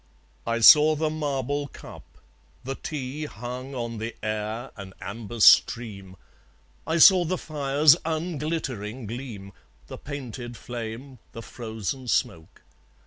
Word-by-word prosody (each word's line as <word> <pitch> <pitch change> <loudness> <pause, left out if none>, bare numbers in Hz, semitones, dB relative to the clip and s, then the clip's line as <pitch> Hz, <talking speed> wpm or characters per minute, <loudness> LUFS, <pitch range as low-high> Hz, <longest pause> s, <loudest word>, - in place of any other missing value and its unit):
I 115 0 0
saw 150 +6 +8
the 155 0 -1
marble 145 -2 -2
cup; - - -12 0.6
the 135 - -4
tea, 145 +1 -5
Hung 125 +2 -7
on 115 -2 -4
the 115 +1 -5
air, 110 +3 -4
an 95 -2 -10
amber 110 +3 -7
stream; 100 -4 +4 0.7
I 160 - +1
saw 180 +2 +8
the 180 +2 -2
fire's 145 -1 +3
unglittering 150 - -3
gleam, 110 -4 -8 0.3
The - - -10
painted 125 -4 -7
flame, 120 +2 -7
the 115 - -8
frozen 115 +3 -6
smoke. 80 -7 -2
125 Hz, 120 wpm, -25 LUFS, 110-145 Hz, 0.7 s, saw